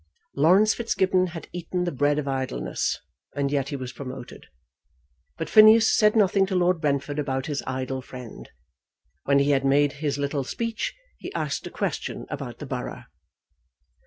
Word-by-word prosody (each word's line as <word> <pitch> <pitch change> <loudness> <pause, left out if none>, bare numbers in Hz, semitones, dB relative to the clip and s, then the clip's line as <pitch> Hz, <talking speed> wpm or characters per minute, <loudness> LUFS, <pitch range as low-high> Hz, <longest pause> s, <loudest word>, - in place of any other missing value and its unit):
Laurence 185 +9 +5
Fitzgibbon 190 -5 +1
had 170 -2 -8
eaten 180 +1 -3
the 175 - -1
bread 145 +1 +1
of 150 -2 -2
idleness, 130 -1 -2 0.4
and 140 -1 0
yet 140 -1 0
he 145 - -3
was 130 -2 -6
promoted. 130 -2 -9 0.9
But 160 - -3
Phineas 220 +4 +7
said 210 -1 +4
nothing 195 -2 +3
to 190 - -2
Lord 180 -2 +2
Brentford 145 0 -1
about 135 -2 -2
his 145 -2 -2
idle 130 0 -3
friend. 125 -2 -10 0.8
When 140 0 +4
he 140 +1 +3
had 135 -1 +2
made 140 +1 +3
his 145 -3 -1
little 140 0 -1
speech 230 - -3 0.2
he - - -7
asked - - -2
a - - -6
question - - -3
about - - -5
the - - -7
borough. - - -5
145 Hz, 160 wpm, -25 LUFS, 135-185 Hz, 0.9 s, Phineas